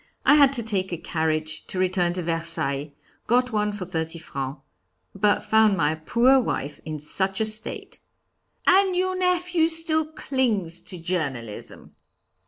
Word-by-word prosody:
I - - +6
had 285 -2 +6
to 240 -4 -3
take 195 -4 -2
a 175 - -3
carriage 155 -1 -2
to - - -4
return 180 -1 +1
to 180 0 -4
Versailles 165 -4 -1 0.4
got 250 +2 +2
one 210 -1 0
for 205 -3 -6
thirty 165 -2 -3
francs. 135 -3 -6 0.5
But 205 +1 +1
found 220 -2 +3
my 155 -2 +1
poor 235 +12 +3
wife 150 - -3
in 155 -1 -4
such 190 +6 -1
a 220 - +1
state!" 215 +1 +1 0.7
"And 380 -1 +4
your 370 +1 0
nephew 360 -2 +1
still 315 -1 +1
clings 220 - -1
to 185 - -6
journalism?" 145 - -5
190 Hz, 150 wpm, -24 LUFS, 160-260 Hz, 0.7 s, I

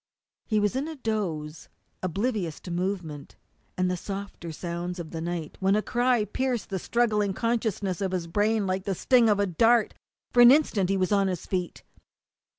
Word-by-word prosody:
He 215 -2 +2
was 205 +2 +1
in 275 +3 -1
a 320 - -6
doze, 180 - -3 0.3
oblivious 185 - -2
to 180 - -8
movement 175 -5 -4 0.4
and 185 0 +2
the 180 - 0
softer 195 -2 -6
sounds 175 +2 -4
of 170 -3 -7
the 165 - -5
night, 170 -2 -4
when 195 +1 +3
a 215 - +1
cry 245 -2 +2
pierced 245 +1 -2
the 190 - -1
struggling 210 -3 +1
consciousness 215 -6 -1
of 190 -2 -1
his 180 -2 -2
brain 205 +4 +1
like 185 0 -2
the 195 - -1
sting 240 +3 +4
of 205 -1 +3
a 200 - +3
dart. 225 +5 +3 0.4
In 245 - +6
an 240 +1 +10
instant 230 -10 +3
he 195 - +2
was 185 0 0
on 200 -1 +3
his 180 -3 -3
feet. 180 -2 -3
195 Hz, 185 wpm, -27 LUFS, 175-225 Hz, 0.4 s, an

